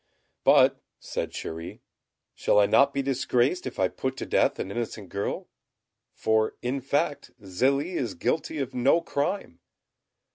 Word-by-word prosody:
"But," - - +5 0.2
said - - -4
Chéri, 80 +1 -7 0.5
"shall - - +1
I 105 - +6
not 140 +7 +4
be 140 - -1
disgraced 135 +4 +1
if - - -7
I 95 - +3
put 130 +7 -4
to - - -4
death - - +2
an 95 - -4
innocent 110 -3 -4
girl? 100 0 -3 0.7
For 110 0 +1
in 130 +3 -1
fact 145 +1 -1
Zélie 135 - 0
is 230 - -2
guilty 160 - -1
of 135 -2 -3
no 135 +7 +3
crime." 155 - -2
130 Hz, 145 wpm, -27 LUFS, 110-140 Hz, 0.7 s, I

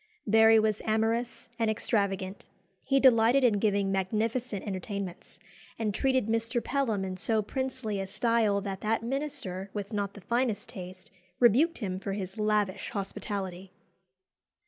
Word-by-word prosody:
Barry 220 +1 +6
was 215 -1 +2
amorous 225 +2 0
and 225 -1 +2
extravagant. 200 -3 -1 0.4
He 275 0 +2
delighted 250 0 +5
in 220 -5 +4
giving 200 -2 +1
magnificent 215 +3 -1
entertainments, 195 -2 -5 0.4
and 215 -2 -1
treated 260 +1 +1
Mr. 230 +2 0
Pelham 230 -9 0
in 185 -1 -5
so 220 +3 +1
princely 255 -3 -3
a 195 - -3
style 215 0 +1
that 195 -1 -5
that 225 +1 0
minister 230 -8 -3
(with 205 +1 -4
not 200 -1 -2
the 205 - -10
finest 235 0 -1
taste) 185 -1 -9 0.3
rebuked 255 +8 +4
him 190 -5 -3
for 195 0 -4
his 195 +1 -5
lavish 210 -2 0
hospitality. 195 -2 -5
210 Hz, 140 wpm, -29 LUFS, 195-230 Hz, 0.4 s, Barry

